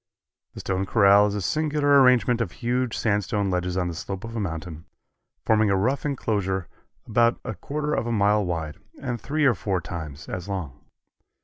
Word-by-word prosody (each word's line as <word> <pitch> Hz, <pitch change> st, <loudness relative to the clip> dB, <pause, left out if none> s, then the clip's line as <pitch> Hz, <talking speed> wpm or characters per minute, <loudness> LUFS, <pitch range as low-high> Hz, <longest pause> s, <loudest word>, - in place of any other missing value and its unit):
The -, -, -6 dB
Stone 95 Hz, 0 st, -2 dB
Corral 100 Hz, -1 st, +5 dB
is 105 Hz, -, -3 dB
a 100 Hz, -, -3 dB
singular 145 Hz, -, +3 dB
arrangement 125 Hz, -2 st, +4 dB
of 95 Hz, -6 st, -3 dB
huge 125 Hz, 0 st, -1 dB
sandstone 100 Hz, -2 st, 0 dB
ledges 90 Hz, 0 st, -1 dB
on 90 Hz, -1 st, 0 dB
the 85 Hz, -, -3 dB
slope 95 Hz, +3 st, -6 dB
of 115 Hz, 0 st, -7 dB
a -, -, -2 dB
mountain, 80 Hz, -4 st, -5 dB, 0.6 s
forming 110 Hz, -1 st, +3 dB
a 100 Hz, -, +3 dB
rough 130 Hz, +9 st, 0 dB
inclosure 100 Hz, -, -1 dB, 0.4 s
about 115 Hz, +1 st, +2 dB
a 120 Hz, -, -3 dB
quarter 150 Hz, -, -3 dB
of 115 Hz, -, -1 dB
a -, -, -1 dB
mile 105 Hz, -1 st, +3 dB
wide 80 Hz, -3 st, -3 dB, 0.2 s
and 120 Hz, -5 st, -4 dB
three 150 Hz, +4 st, 0 dB
or 130 Hz, -, +5 dB
four 95 Hz, -1 st, -2 dB
times 80 Hz, -5 st, -7 dB
as 90 Hz, +2 st, -6 dB
long. 90 Hz, -10 st, -5 dB
105 Hz, 185 wpm, -25 LUFS, 90-120 Hz, 0.6 s, Corral